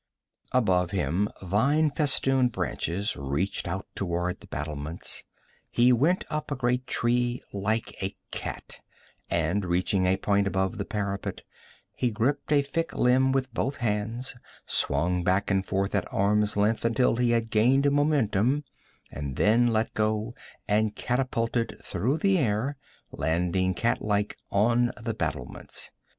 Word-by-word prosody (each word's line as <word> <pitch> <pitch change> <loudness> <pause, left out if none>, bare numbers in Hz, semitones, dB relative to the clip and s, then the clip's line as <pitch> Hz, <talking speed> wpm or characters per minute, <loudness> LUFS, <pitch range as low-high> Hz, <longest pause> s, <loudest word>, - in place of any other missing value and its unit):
Above 95 -8 +2
him 95 +2 0
vine 140 - +2
festooned 135 -3 +2
branches 100 -1 -2
reached 70 +9 -2
out 95 +3 -3
toward 90 -1 -2
the - - -15
battlements. 75 +2 -3 0.5
He 125 +1 +4
went 155 +10 +2
up 155 0 -3
a 145 - -1
great 125 0 0
tree 120 +1 +1
like 110 +3 -1
a 95 +1 -3 0.2
cat, - - -6 0.5
and 85 +4 0
reaching 90 +1 +1
a 95 +1 +3
point 100 0 +1
above 95 -1 -1
the - - -2
parapet, 100 -3 -3 0.5
he 125 - +1
gripped 120 +8 -1
a 145 -1 +4
thick 165 +4 -3
limb 130 +2 +4
with 130 -2 -1
both 135 +4 -1
hands, 115 +2 -2 0.3
swung 90 +1 +2
back 95 +3 +1
and 95 -1 +2
forth 95 +1 -1
at 100 -3 -1
arm's 105 +1 +2
length 105 +2 +2
until 115 +1 +2
he 120 -1 +2
had 115 -1 +1
gained 135 +6 +4
momentum, 140 -3 +2 0.5
and 70 -3 -5
then 115 +7 +4
let 110 -1 0
go 110 +2 0 0.3
and 105 0 +1
catapulted 120 -2 -1
through 135 +8 -1
the 195 +2 +3
air, 120 +2 0 0.4
landing 90 +4 0
cat 120 - 0
like 105 -1 0
on 120 +4 +3
the 115 0 -3
battlements. 65 - -5
110 Hz, 140 wpm, -27 LUFS, 95-125 Hz, 0.5 s, He